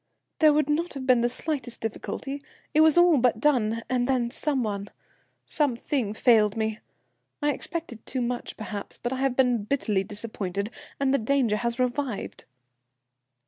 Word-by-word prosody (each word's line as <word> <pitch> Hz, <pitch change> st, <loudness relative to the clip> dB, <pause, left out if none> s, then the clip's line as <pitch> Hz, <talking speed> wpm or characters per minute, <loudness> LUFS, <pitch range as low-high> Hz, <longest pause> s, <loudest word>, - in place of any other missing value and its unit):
"There 310 Hz, -1 st, +7 dB
would 295 Hz, -1 st, +2 dB
not 310 Hz, +2 st, -1 dB
have 265 Hz, -1 st, -5 dB
been 255 Hz, -2 st, +5 dB
the 240 Hz, -, +2 dB
slightest 260 Hz, -1 st, -3 dB
difficulty; 270 Hz, +5 st, -4 dB, 0.3 s
it 305 Hz, -, +5 dB
was 315 Hz, 0 st, +6 dB
all 345 Hz, -4 st, +6 dB
but 240 Hz, -2 st, +2 dB
done, 230 Hz, -5 st, +2 dB
and 250 Hz, -1 st, 0 dB
then 250 Hz, -3 st, +1 dB
some 275 Hz, -1 st, -1 dB
one, 200 Hz, -2 st, -3 dB, 0.6 s
something, 255 Hz, -5 st, 0 dB
failed 220 Hz, -3 st, +4 dB
me. 220 Hz, 0 st, -1 dB, 0.6 s
I 295 Hz, 0 st, +1 dB
expected 320 Hz, -11 st, -5 dB
too 255 Hz, -, -2 dB
much 245 Hz, 0 st, -4 dB
perhaps, 210 Hz, -2 st, -6 dB
but 240 Hz, +2 st, -3 dB
I -, -, -3 dB
have 265 Hz, -1 st, 0 dB
been 250 Hz, -4 st, +3 dB
bitterly 210 Hz, -5 st, 0 dB
disappointed, 205 Hz, -1 st, -4 dB, 0.3 s
and 275 Hz, -1 st, +2 dB
the 275 Hz, -, +3 dB
danger 235 Hz, -2 st, +2 dB
has 235 Hz, +1 st, -2 dB
revived." 255 Hz, -2 st, -2 dB
245 Hz, 160 wpm, -26 LUFS, 220-280 Hz, 0.6 s, There